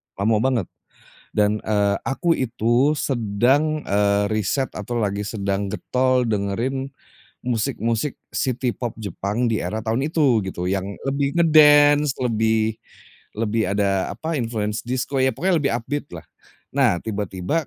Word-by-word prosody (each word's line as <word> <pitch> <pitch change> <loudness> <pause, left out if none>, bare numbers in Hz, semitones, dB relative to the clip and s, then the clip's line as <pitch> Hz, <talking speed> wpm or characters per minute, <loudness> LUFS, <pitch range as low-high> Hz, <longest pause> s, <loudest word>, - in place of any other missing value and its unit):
lama 110 +3 +1
banget, 125 -6 0 0.7
dan, 105 0 +2
eee, 100 -2 +1
aku 165 +5 +1
itu 120 +3 +1
sedang, 135 +4 +1
eee, 100 0 +2
riset 110 +6 0
atau 115 +3 -3
lagi 100 0 -1
sedang 100 -1 -2
getol 130 +2 +1
dengerin, 115 +6 -1 0.6
musik-musik 120 +1 -1 0.2
city 125 -1 -1
pop 120 -3 -5
Jepang 110 +3 -2
di 110 - 0
era 110 +1 -4
tahun 125 +7 0
itu 140 -9 +3
gitu, 90 -1 -5
yang 95 +1 -2
lebih 140 +2 -1
nge-dance 150 -3 +6
lebih 110 -1 +1 0.6
lebih 110 -2 0
ada 100 -1 0
apa 160 +5 -3
influence 110 -2 -2
disko. 130 +2 -2
Ya 130 - +4
pokoknya 175 +6 +1
lebih 140 -4 0
up 115 - -7
beat-lah. 145 0 -5 0.5
Nah 90 - +3
tiba-tiba, 105 - -2
115 Hz, 135 wpm, -22 LUFS, 105-135 Hz, 0.7 s, nge-dance